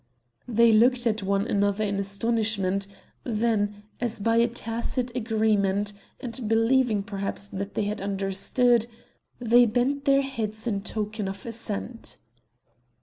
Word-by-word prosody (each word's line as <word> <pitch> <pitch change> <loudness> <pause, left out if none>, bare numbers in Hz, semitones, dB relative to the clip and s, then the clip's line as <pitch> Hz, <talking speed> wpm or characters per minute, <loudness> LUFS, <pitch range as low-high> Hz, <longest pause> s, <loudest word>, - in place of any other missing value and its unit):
They 235 -1 +5
looked 240 +3 +4
at 220 -1 +1
one 195 +1 0
another 205 -2 +1
in 200 -1 -1
astonishment; 200 -1 0 0.4
then, 210 -3 0 0.2
as 235 -2 -1
by 230 +3 +2
a 235 +1 +5
tacit 235 +1 -3
agreement, 210 -3 +1 0.3
and 235 -2 -5
believing 225 -1 +3
perhaps 200 0 -3
that 200 +1 -5
they - - +1
had 205 0 -3
understood, 200 +5 +1 0.5
they 240 0 +5
bent 255 +5 0
their 275 0 +4
heads 220 -5 -4
in 205 -4 -1
token 215 0 -3
of 195 0 -7
assent. 230 0 -5
220 Hz, 130 wpm, -26 LUFS, 200-235 Hz, 0.5 s, They